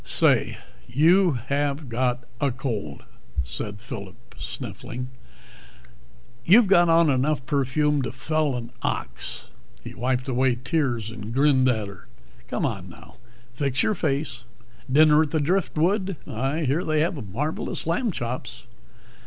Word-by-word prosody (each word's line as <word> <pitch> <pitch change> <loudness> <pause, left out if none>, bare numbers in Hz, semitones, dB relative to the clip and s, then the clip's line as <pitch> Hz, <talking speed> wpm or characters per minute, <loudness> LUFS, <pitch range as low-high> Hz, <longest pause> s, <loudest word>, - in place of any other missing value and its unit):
"Say, - - +3 0.3
you 165 +7 +4
have 140 +4 -1
got 125 +1 0 0.2
a 140 - +2
cold," 115 - -4 0.4
said 100 +11 -5
Phillip, 100 -5 -9
sniffing. 125 0 -6 1.3
"You've 210 - +7
got 175 -3 +5
on 165 -2 +5
enough 135 0 +1
perfume 145 +1 +1
to 120 -3 -3
fell 145 +3 0
an 115 -1 -5
ox." - - -3 0.4
He - - -8
wiped 125 +2 -1
away 130 -1 +2
tears 125 -4 -1
and 110 -1 -7
grinned 130 0 +4
at 110 -4 0
her. 100 -2 -12 0.4
"Come - - -1
on - - -3
now, - - -15 0.4
fix 135 +1 +1
your 215 - +2
face. 140 - -2 0.5
Dinner 150 +2 +6
at 155 - 0
the 160 - 0
Driftwood? 185 +3 +1
I 135 +8 -2
hear 150 +4 +1
they 155 -2 +1
have 150 - -2
marvelous 150 +9 -2
lamb 220 +8 0
chops." 125 -5 -4
135 Hz, 135 wpm, -25 LUFS, 120-155 Hz, 1.3 s, You've